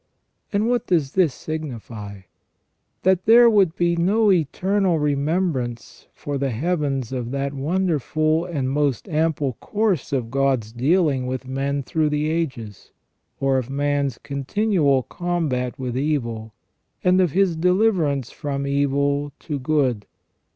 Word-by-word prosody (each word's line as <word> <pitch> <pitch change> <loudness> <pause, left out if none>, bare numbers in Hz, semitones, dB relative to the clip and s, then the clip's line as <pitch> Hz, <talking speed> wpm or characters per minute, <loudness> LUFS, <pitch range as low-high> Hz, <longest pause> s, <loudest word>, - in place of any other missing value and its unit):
And 210 +1 +1
what 245 0 0
does 155 -7 +1
this 180 -6 +3
signify? 115 -10 -7 0.8
That 190 -1 +2
there 235 +2 +7
would 195 -6 +3
be 175 -1 +1
no 200 +5 +3
eternal 185 +2 +1
remembrance 145 -4 -2
for 145 -1 -4
the 135 0 0
heavens 140 -1 -1
of 125 -3 -3
that 140 +1 -2
wonderful 155 +1 0
and 140 -7 -2
most 145 - 0
ample 155 -4 0
course 210 -7 -1
of 125 -5 -2
God's 135 -5 +1
dealings 135 +1 +1
with 130 0 -4
men 140 +1 -2
through 155 +3 0
the 150 +1 0
ages, 130 - -4 0.5
or 135 -1 +2
of 130 0 -6
man's 140 -2 0
continual 145 0 0
combat 155 -9 -2
with 125 -2 -4
evil, 120 -6 -2 0.5
and 180 +1 +4
of 175 -6 +1
his 190 -3 +2
deliverance 175 - +1
from 140 -1 -4
evil 140 +1 0
to 150 -3 -4
good. 130 -6 0
145 Hz, 130 wpm, -22 LUFS, 130-175 Hz, 0.8 s, there